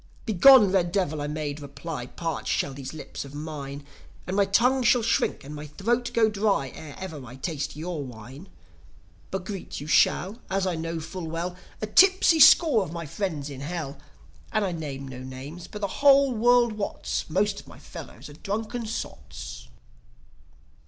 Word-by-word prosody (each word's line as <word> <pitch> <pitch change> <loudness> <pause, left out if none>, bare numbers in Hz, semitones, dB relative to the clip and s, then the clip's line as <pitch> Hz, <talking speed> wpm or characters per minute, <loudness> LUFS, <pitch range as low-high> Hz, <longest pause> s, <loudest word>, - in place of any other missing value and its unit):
"Begone, 220 0 +7
red 175 -3 +2
Devil!" 165 -6 0
I 145 - -2
made 150 -1 -4
reply. 145 -2 -6
"Parch 165 +4 -4
shall 140 - 0
these 135 -1 -7
lips 155 -2 -7
of 140 0 -11
mine, 145 -2 -6 0.4
And 185 - -3
my 200 0 +4
tongue 250 +7 +3
shall 245 -1 +4
shrink, 230 - +1
and 145 +2 -8
my 150 0 -7
throat 235 - -1
go 225 -1 +4
dry, 200 -10 +1
Ere 150 -3 -9
ever 160 -7 -7
I 125 0 -10
taste 145 +1 -4
your 160 -1 -4
wine! 130 - -11 0.8
But 190 -1 -4
greet 195 -2 -6
you 145 - -7
shall, 195 +7 +2
as 195 0 0
I 185 - 0
know 165 0 -3
full 165 +2 -6
well, 170 +3 -3 0.3
A - - +2
tipsy 370 - +5
score 300 -5 +7
of 155 - -7
my 170 -1 -5
friends 155 -3 -3
in 135 -1 -8
Hell. 150 -2 -5 0.5
And 215 -1 +1
I 185 - -1
name 140 -5 -5
no 130 -1 -8
names, 130 +6 -8
but 210 - -8
the 200 - 0
whole 280 -1 +6
world 240 0 +4
wots - - -3
Most - - +1
of - - -14
my - - -13
fellows 125 +6 -10
are 145 - -11
drunken 220 +7 -4
sots." 65 - -7
165 Hz, 180 wpm, -26 LUFS, 140-210 Hz, 0.8 s, Begone